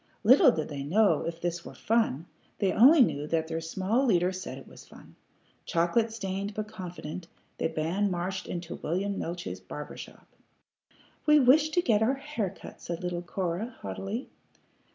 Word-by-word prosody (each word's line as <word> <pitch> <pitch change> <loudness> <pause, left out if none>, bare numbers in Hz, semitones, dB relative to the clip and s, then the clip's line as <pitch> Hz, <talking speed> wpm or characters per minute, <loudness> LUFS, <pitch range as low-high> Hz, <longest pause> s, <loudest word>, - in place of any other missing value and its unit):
Little 260 - +7
did 155 -8 -3
they 145 -2 -5
know 200 +9 +3
if 165 0 -4
this 175 0 -3
were - - -10
fun; 220 - +1 0.3
they 195 -2 +1
only 275 - +7
knew 150 - +2
that 160 0 0
their 165 0 -3
small 190 +9 0
leader 185 -7 +3
said 185 -8 -6
it 135 - -12
was - - -13
fun. - - -16 0.5
Chocolate 175 +7 +1
stained 200 -1 -4
but 215 0 -3
confident, 180 -4 -7 0.3
the - - +1
band 170 +6 0
marched 185 +1 -3
into 170 -1 -5
William 195 +5 -2
Neeltje's 175 +1 -5
barber - - -8
shop. - - -11 1.0
"We 300 0 +7
wish 290 +4 +5
to 345 +3 +1
get 220 -7 +3
our 245 +5 +3
hair 270 -8 -3
cut," 190 - -12
said 170 0 -5
little 175 -1 -2
Cora, 185 +6 -3
haughtily. 210 +6 -4
190 Hz, 170 wpm, -28 LUFS, 170-225 Hz, 1.0 s, Little